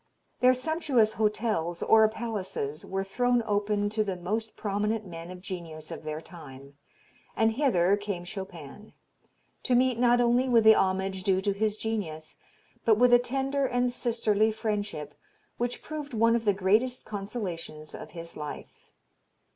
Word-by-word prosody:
Their 255 0 +5
sumptuous 260 -6 +1
'hotels' 210 -6 0
or 220 -1 +6
palaces 195 -10 -4
were 195 0 -3
thrown 245 +4 +1
open 205 0 0
to 215 +1 0
the 195 -3 -3
most 215 +5 -3
prominent 210 +1 -1
men 170 -1 -8
of 180 0 -9
genius 165 -5 -7
of - - -6
their 155 0 -4
time, 140 -5 -12 0.6
and 225 0 +3
hither 205 -8 +3
came 200 -4 -4
Chopin, 190 0 -9 0.7
to 250 - +1
meet 250 -1 +3
not 245 0 +4
only 245 +2 +3
with 230 -2 +5
the 220 0 +9
homage 190 -1 0
due 190 0 +2
to 200 - +1
his 210 +1 -1
genius, 185 -9 -4 0.5
but 220 -2 +4
with 245 +1 +5
a 245 - +8
tender 270 +2 -1
and 245 0 +1
sisterly 225 -3 +1
friendship, 205 -9 -3 0.5
which 245 0 -2
proved 295 -4 -6
one 230 +1 +4
of 230 -1 -1
the 205 - +4
greatest 215 +7 +1
consolations 190 -7 -6
of - - -8
his 170 -1 -9
life. 150 - -9
210 Hz, 155 wpm, -28 LUFS, 185-235 Hz, 0.7 s, the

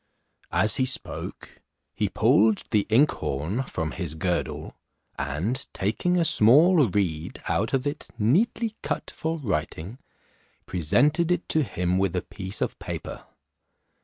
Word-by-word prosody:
As 105 - +2
he 130 - +2
spoke, 130 - -1 0.3
he - - -1
pulled 110 0 +3
the 105 -2 +2
inkhorn 110 - +1
from 80 -11 -4
his 85 -4 -4
girdle, 90 +2 -2 0.4
and 80 - -2
taking 110 - 0
a 170 - +2
small 150 - +5
reed 85 -5 -2
out 110 +3 0
of 135 0 0
it 145 +1 -4
neatly 215 - +1
cut - - -3
for 160 +1 -3
writing, 100 - -3 0.7
presented 145 - +2
it 180 0 0
to 160 - +2
him 90 -7 -1
with 95 -3 0
a - - -1
piece 95 0 -8
of - - -2
paper. - - -6
110 Hz, 135 wpm, -25 LUFS, 90-150 Hz, 0.7 s, small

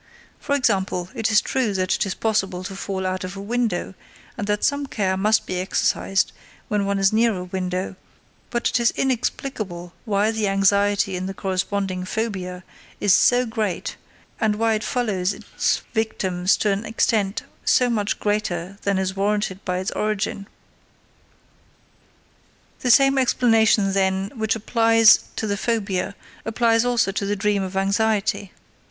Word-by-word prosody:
For 285 - -1
example, 190 -8 0
it 225 -4 -1
is 215 0 +5
true 240 -7 -1
that 185 0 +1
it - - 0
is 190 - -3
possible 195 -5 -1
to 195 +1 -6
fall 190 -1 -4
out 185 0 -2
of 185 +2 -6
a - - -6
window, 215 -3 -1 0.4
and 205 -3 -4
that 210 0 0
some 285 0 +1
care 195 -6 -1
must 210 +3 +2
be 185 - -3
exercised 190 +1 0 0.4
when 205 -1 0
one 200 0 0
is 195 +1 +3
near 225 -1 +3
a 180 - -4
window, 185 0 -3 0.5
but 240 -1 0
it - - +1
is 235 - +4
inexplicable 215 -8 -2
why 210 0 +1
the 220 -2 -1
anxiety 200 0 +2
in 185 +1 -3
the 195 - -5
corresponding 190 0 -2
phobia 185 -3 -4 0.4
is 205 - +4
so 245 +1 +4
great, 215 -5 -3 0.4
and 220 -3 +1
why 225 +1 +1
it 215 0 -1
follows 205 -7 -1
its - - -1
victims 195 -4 0
to 210 - +1
an 200 +2 -1
extent 215 -2 0 0.2
so 250 - +3
much 215 -4 -1
greater 200 -3 -2
than 200 -1 0
is 190 0 -1
warranted 200 -1 -1
by 180 0 -1
its 185 +2 -2
origin. 205 -1 -2 2.3
The 250 - -1
same 275 +3 +5
explanation, 225 -5 +3
then, 190 0 0
which 220 -3 -1
applies 225 0 +5
to - - -2
the 200 -1 -1
phobia 200 -4 -1 0.3
applies 225 0 +2
also 240 -5 +2
to 200 - -3
the 205 - 0
dream 205 0 +1
of 190 0 -4
anxiety. 200 0 0
205 Hz, 160 wpm, -22 LUFS, 190-225 Hz, 2.3 s, is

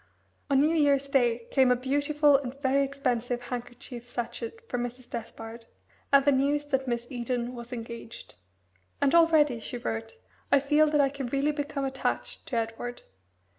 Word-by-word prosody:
On 275 -1 +4
New 305 +3 +4
Year's 280 -3 +2
Day 240 -3 +2
came 265 -2 +4
a 250 - +5
beautiful 285 +3 +3
and 270 -1 -2
very 275 0 +2
expensive 250 -3 -1
handkerchief 245 0 -7
sachet 235 -1 -4
for 245 - -2
Mrs. 245 +1 -5
Despard, 225 0 -8 0.4
and 275 -1 +6
the 285 - +6
news 285 +2 +2
that 265 -1 0
Miss 240 -1 -1
Eden 245 0 -2
was 235 0 -9
engaged. 230 -1 -8 0.7
"And 285 +1 +2
already," 315 -7 +5
she 245 - -6
wrote, 225 -1 -4 0.4
"I 280 - +7
feel 295 +3 +4
that 295 -1 +3
I 275 - +3
can 275 -2 -5
really 275 +4 +1
become 290 -1 -3
attached 265 0 -3
to 240 - -2
Edward. 230 +2 -4
265 Hz, 165 wpm, -28 LUFS, 240-280 Hz, 0.7 s, I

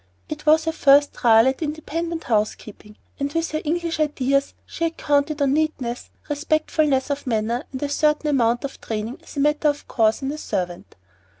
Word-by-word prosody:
It 300 0 -7
was 315 +1 +5
her 325 - +1
first 285 -2 +4
trial 225 -1 +5
at 265 +3 -1
independent 325 +2 -3
housekeeping, 215 -1 -3 0.2
and 280 0 -2
with 330 +2 -1
her 310 0 -2
English 330 +1 -2
ideas 275 -2 0
she 335 - -3
had 330 0 -3
counted 290 0 +1
on 275 -1 +2
neatness, 280 -6 -2 0.2
respectfulness 295 -2 0
of 285 -1 -4
manner, 230 +1 -1
and 260 +1 -5
a - - 0
certain 300 +1 +1
amount 240 -2 +2
of 280 - -6
training 225 +6 -4
as 325 - -13
a - - +1
matter 300 +1 +2
of 290 0 -1
course 220 +2 +1
in 270 - -1
a 305 - -6
servant. 175 -7 -4
285 Hz, 185 wpm, -22 LUFS, 250-310 Hz, 0.2 s, was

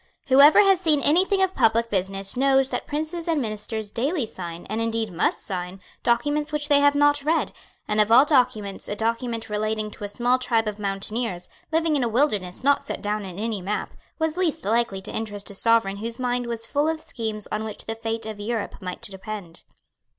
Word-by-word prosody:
Whoever 280 +8 +8
has 390 -3 +4
seen 310 -5 +3
anything 380 +6 +4
of 380 0 +1
public 230 -3 +2
business 195 0 -2
knows 270 0 +3
that - - -4
princes 315 +3 -3
and 325 -3 +1
ministers 215 -2 -3
daily 275 +4 -1
sign, 175 -5 -8
and 225 - -3
indeed 225 -3 -1
must 170 - 0
sign, 180 0 -5 0.2
documents 290 +5 +1
which 295 0 -1
they 285 -1 +6
have 285 0 +4
not 290 0 +4
read; 320 +3 +1 0.4
and 210 0 +2
of 210 +1 +1
all 255 +5 +8
documents 250 -9 +1
a 205 - -2
document 230 +1 -2
relating 215 0 -2
to 210 - -10
a - - -2
small 245 +5 +1
tribe 230 -3 +1
of 210 0 -4
mountaineers, 200 -1 -3 0.2
living 325 -1 +2
in 275 - +1
a 235 - 0
wilderness 215 -8 0
not 285 +1 +3
set - - -6
down 210 0 -2
in 185 -2 -8
any 215 -1 -2
map, 205 +4 -3 0.2
was 320 0 -1
least 330 -4 -1
likely 215 -3 +1
to - - -7
interest 205 -2 -4
a - - -10
Sovereign 200 -1 +2
whose 230 +3 -5
mind 245 -1 -1
was 230 -1 -3
full 290 +6 0
of 320 0 -2
schemes 220 -7 -5
on 215 +1 -2
which 215 -1 -7
the 225 - -3
fate 225 0 -4
of 215 -1 -6
Europe 220 0 -4
might 180 +3 -6
depend. 195 -4 -7
230 Hz, 200 wpm, -24 LUFS, 210-285 Hz, 0.4 s, Whoever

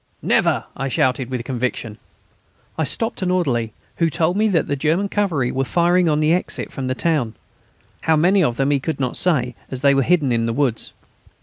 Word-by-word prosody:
"Never!" - - +2
I 135 - -3
shouted, 130 -1 0
with 125 -2 -3
conviction. 120 -4 -3 0.8
I 160 - -1
stopped 225 +9 -2
an 185 - 0
orderly, 130 -12 0 0.3
who 165 -1 +2
told 170 +3 0
me 215 +2 +2
that 175 -7 +1
the 140 - -1
German 160 +8 0
cavalry 165 -13 0
were 135 - -1
firing 175 +4 +2
on 150 -1 +1
the 155 +2 +3
exit 180 - -2
from 135 -1 -4
the 130 - -1
town. 140 -8 0 0.7
How 160 - +2
many 180 +5 +3
of 120 -5 0
them 135 +1 +1
he 140 - +2
could 155 +3 -4
not 130 -2 -1
say, 130 -9 +1 0.2
as 130 0 -6
they 140 -1 +5
were 135 - +3
hidden 150 -2 +2
in 115 -1 +1
the 115 - -1
woods. 130 -4 -1
145 Hz, 205 wpm, -20 LUFS, 125-170 Hz, 0.8 s, they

